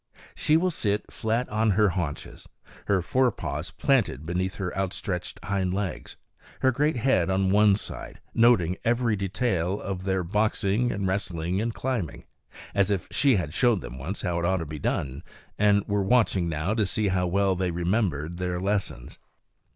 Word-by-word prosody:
She 155 - +3
will 180 +2 +1
sit 105 -9 -1
flat 115 +3 -1
on 110 +1 +1
her 105 -2 +5
haunches, 85 -5 -5 0.4
her 95 -3 +2
fore 130 +6 +3
paws - - -4
planted 70 - +1
between 90 +3 -1
her 95 -1 -5
outstretched 95 -1 -3
hind 95 -2 -1
legs, 100 -2 -4 0.4
her 130 - +4
great 145 +5 +1
head 110 -8 +2
on 95 0 +2
one 105 0 +5
side, 105 - -6
noting 105 -7 +4
every 115 -1 +2
detail 95 -2 -1
of 95 -2 -4
their 95 -1 0
boxing 105 +4 +1
and 100 0 -2
wrestling 90 -1 -1
and 115 +1 -1
climbing, 120 - -3 0.5
as 100 -1 +2
if 100 -4 -1
she 140 -4 +3
had 80 -6 -2
showed 120 -3 +3
them 65 - -8
once 95 +10 -5
how 90 -3 0
it 85 - -1
ought 95 +2 +2
to 85 - -3
be 75 0 -7
done 70 -1 -2 0.4
and 100 -1 +3
were 100 0 +1
watching 95 -5 +2
now 80 +6 -1
to 110 -3 +1
see 105 +1 0
how 90 -1 +1
well 95 +1 +2
they 90 0 -1
remembered 85 -2 -1
their 90 -1 -2
lessons. 100 -10 -3
95 Hz, 175 wpm, -26 LUFS, 90-110 Hz, 0.5 s, her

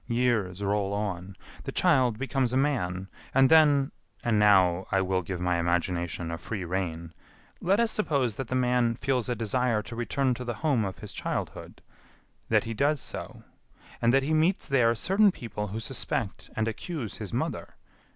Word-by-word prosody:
Years 115 -6 0
roll 100 0 0
on. 100 -2 -3 0.3
The - - -3
child 125 -4 +3
becomes 135 -1 0
a 130 - +1
man; 95 -10 0 0.3
and 135 -1 +6
then 150 -3 +5 0.3
and 110 -3 +2
now 95 -3 +4
I 95 - +3
will 95 0 0
give 90 0 -5
my 90 -1 +1
imagination 85 -1 -1
a 85 - -4
free 100 -5 -5
rein 85 -2 -3 0.5
let 195 +4 +2
us 235 -1 +2
suppose 140 - 0
that 135 - -4
the 130 - -2
man 125 -2 +2
feels 125 -1 -1
a 125 - 0
desire 115 0 0
to 115 - -8
return 130 +2 0
to 125 - -6
the 120 -2 -3
home 130 -8 +2
of 95 - -5
his - - -8
childhood, - - -5 0.7
that - - +3
he 115 - -4
does 140 +6 +1
so, - - -6 0.6
and 115 - +4
that 135 +1 +3
he 155 +3 0
meets 165 +5 +2
there 120 -4 +3
certain 195 - +3
people 105 - -5
who 105 +3 -4
suspect 115 -3 -3
and 110 0 0
accuse 115 - -4
his - - -6
mother.... - - -3
115 Hz, 180 wpm, -28 LUFS, 95-135 Hz, 0.7 s, and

